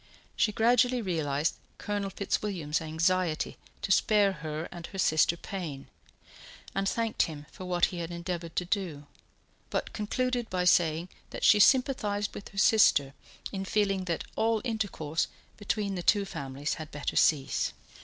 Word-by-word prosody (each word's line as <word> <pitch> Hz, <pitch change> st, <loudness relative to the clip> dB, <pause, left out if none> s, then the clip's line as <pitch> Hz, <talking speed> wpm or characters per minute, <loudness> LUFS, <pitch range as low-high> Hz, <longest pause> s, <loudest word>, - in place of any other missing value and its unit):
She 215 Hz, -, +2 dB
gradually 245 Hz, +3 st, +3 dB
realized 160 Hz, -7 st, -1 dB, 0.2 s
Colonel 205 Hz, -1 st, -2 dB
Fitzwilliam's 185 Hz, -6 st, -2 dB
anxiety 165 Hz, +1 st, 0 dB, 0.3 s
to 195 Hz, -, -1 dB
spare 205 Hz, 0 st, +4 dB
her 155 Hz, -2 st, -5 dB
and 170 Hz, -1 st, -8 dB
her 195 Hz, -, -9 dB
sister 160 Hz, -1 st, +3 dB
pain, 165 Hz, -8 st, -6 dB, 0.8 s
and 195 Hz, 0 st, 0 dB
thanked 230 Hz, -1 st, 0 dB
him 150 Hz, -2 st, -8 dB
for 185 Hz, -, -9 dB
what 175 Hz, -1 st, +3 dB
he 175 Hz, -, -4 dB
had 165 Hz, -1 st, -4 dB
endeavoured 170 Hz, -1 st, -5 dB
to 180 Hz, -, 0 dB
do; 175 Hz, -7 st, -2 dB, 0.6 s
but -, -, -3 dB
concluded 245 Hz, +2 st, -1 dB
by 180 Hz, -1 st, 0 dB
saying 170 Hz, 0 st, +3 dB, 0.2 s
that -, -, -7 dB
she 210 Hz, -, +7 dB
sympathized 210 Hz, -4 st, +3 dB
with 200 Hz, -, -8 dB
her 200 Hz, -, -15 dB
sister 170 Hz, -9 st, +5 dB, 0.4 s
in 195 Hz, -1 st, -3 dB
feeling 195 Hz, -1 st, 0 dB
that 170 Hz, -2 st, -2 dB
all 225 Hz, 0 st, +2 dB
intercourse 200 Hz, -9 st, -1 dB, 0.3 s
between 205 Hz, -1 st, -2 dB
the 180 Hz, -, -3 dB
two 200 Hz, +3 st, +3 dB
families 140 Hz, -4 st, -4 dB
had 155 Hz, -, -7 dB
better 145 Hz, 0 st, -4 dB
cease. 140 Hz, -4 st, +2 dB
185 Hz, 150 wpm, -29 LUFS, 160-205 Hz, 0.8 s, she